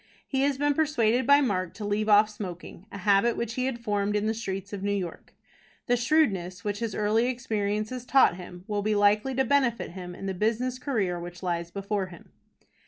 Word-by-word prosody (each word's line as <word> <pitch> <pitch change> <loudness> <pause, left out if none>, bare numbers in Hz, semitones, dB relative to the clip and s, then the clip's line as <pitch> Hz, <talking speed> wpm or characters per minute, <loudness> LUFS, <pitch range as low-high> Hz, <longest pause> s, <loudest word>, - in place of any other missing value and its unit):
He 265 -1 0
has 280 -1 +1
been 290 +1 +2
persuaded 260 -6 +1
by 285 +1 +7
Mark 185 -9 -1
to 210 - -6
leave 210 +1 0
off 210 +1 +6
smoking, 195 -2 -8
a - - -7
habit 200 +4 +3
which 235 -1 -3
he 255 +1 -1
had 265 -3 -2
formed 210 -3 -1
in 210 0 0
the 220 - +1
streets 200 -3 -5
of 200 - -4
New 205 +1 -1
York. 180 -4 -5 0.5
The 245 - +2
shrewdness 205 - +1
which 205 -1 -2
his 230 -3 -3
early 215 +3 +2
experiences 220 -1 -2
taught 255 -7 +4
him 180 0 -10
will 205 0 -2
be 215 +1 0
likely 210 +6 +3
to 265 +1 +2
benefit 250 -7 +1
him 180 -1 -8
in 195 - -8
the 190 - -2
business 230 +6 -1
career 205 -10 -1
which 175 +1 -9
lies 170 -1 -2
before 200 +1 -2
him. 175 -3 -14
210 Hz, 205 wpm, -27 LUFS, 195-245 Hz, 0.5 s, by